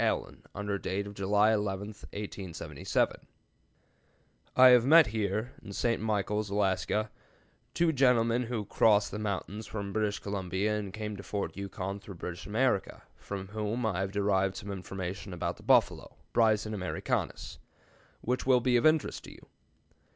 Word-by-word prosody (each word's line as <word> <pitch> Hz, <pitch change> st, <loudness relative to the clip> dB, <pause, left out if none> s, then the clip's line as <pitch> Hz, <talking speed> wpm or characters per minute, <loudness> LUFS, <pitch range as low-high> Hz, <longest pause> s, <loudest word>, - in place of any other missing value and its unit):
Allen, -, -, -1 dB
under 100 Hz, 0 st, -2 dB
date 95 Hz, +2 st, -2 dB
of 100 Hz, -, -8 dB
July 100 Hz, +2 st, +3 dB
11, 100 Hz, -1 st, -2 dB
1877: 95 Hz, -7 st, -3 dB, 1.4 s
"I 130 Hz, 0 st, +9 dB
have 125 Hz, -2 st, +7 dB
met 160 Hz, +4 st, +8 dB
here 110 Hz, +2 st, -2 dB, 0.2 s
[St. 115 Hz, +3 st, 0 dB
Michaels, 105 Hz, -1 st, -1 dB
Alaska] 105 Hz, +2 st, 0 dB, 0.6 s
two 170 Hz, -1 st, +3 dB
gentlemen 125 Hz, -3 st, +3 dB
who 115 Hz, -3 st, -3 dB
crossed 105 Hz, 0 st, +3 dB
the 105 Hz, -, -4 dB
mountains 105 Hz, 0 st, -4 dB
from 100 Hz, -2 st, -5 dB
British 105 Hz, -1 st, 0 dB
Columbia 100 Hz, +1 st, -2 dB
and 105 Hz, -2 st, -4 dB
came 105 Hz, +1 st, -5 dB
to -, -, -7 dB
Fort 100 Hz, +1 st, -4 dB
Yukon 100 Hz, 0 st, -5 dB
through 100 Hz, -1 st, -10 dB
British 90 Hz, +1 st, -7 dB
America, 110 Hz, -1 st, 0 dB
from 95 Hz, -1 st, -7 dB
whom 110 Hz, +3 st, -2 dB
I 100 Hz, -5 st, 0 dB
have 95 Hz, 0 st, -2 dB
derived 95 Hz, -1 st, +1 dB
some 100 Hz, +1 st, -6 dB
information 95 Hz, 0 st, -5 dB
about 90 Hz, -, -3 dB
the -, -, -15 dB
buffalo -, -, +2 dB, 0.2 s
(Bison 110 Hz, -2 st, +3 dB
americanus) 95 Hz, -3 st, -3 dB, 0.6 s
which 125 Hz, +2 st, -2 dB
will 130 Hz, -2 st, +6 dB
be 125 Hz, 0 st, +3 dB
of 120 Hz, -, +4 dB
interest 155 Hz, -1 st, +1 dB
to -, -, -10 dB
you. -, -, -17 dB
105 Hz, 150 wpm, -30 LUFS, 100-110 Hz, 1.4 s, I